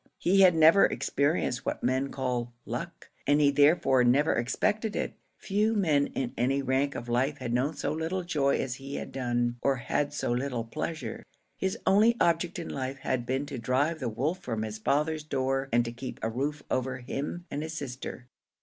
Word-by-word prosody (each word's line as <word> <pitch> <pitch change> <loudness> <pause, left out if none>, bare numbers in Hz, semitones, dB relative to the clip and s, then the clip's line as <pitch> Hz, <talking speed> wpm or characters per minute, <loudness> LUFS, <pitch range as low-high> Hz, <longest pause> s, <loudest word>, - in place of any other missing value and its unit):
He 195 +3 +3
had 180 -3 +7
never 160 +5 +7
experienced 140 -3 0
what - - -3
men 130 +2 +1
called 125 -3 -2 0.2
luck, - - -6 0.2
and 145 +1 +4
he 145 -1 +5
therefore 145 -3 +4
never 135 +6 +4
expected 210 - 0
it. - - -2 0.2
Few 215 +2 +1
men 155 -8 +2
in 130 -3 -2
any 135 +3 +1
rank 135 +2 +1
of 120 - -5
life 130 +5 +1
had 125 -3 -4
known 135 +6 +1
so - - -2
little 165 +4 -2
joy 145 -5 +1
as 130 -2 -2
he 135 +1 -7
had - - -5
done, 120 -2 -1
or 140 -1 +2
had 140 +3 -1
so - - -2
little 125 -1 -1
pleasure; 155 +8 -5 0.3
his 190 0 -2
only 215 +4 +5
object 170 +3 +1
in 170 - -5
life 135 0 -4
had 130 -3 -2
been 130 +2 -1
to 140 -3 -6
drive 140 +7 +1
the 130 - -2
wolf 140 +11 -1
from 115 -11 -3
his 110 0 -5
father's 150 +6 0
door 135 -2 -1
and 120 +1 +3
to 115 - -4
keep 125 +2 -7
a 115 - +1
roof 145 +5 -2
over 130 0 0
him 140 +7 -5
and 145 - -2
his 160 +1 -5
sister. 130 -2 -6
140 Hz, 195 wpm, -29 LUFS, 125-160 Hz, 0.3 s, had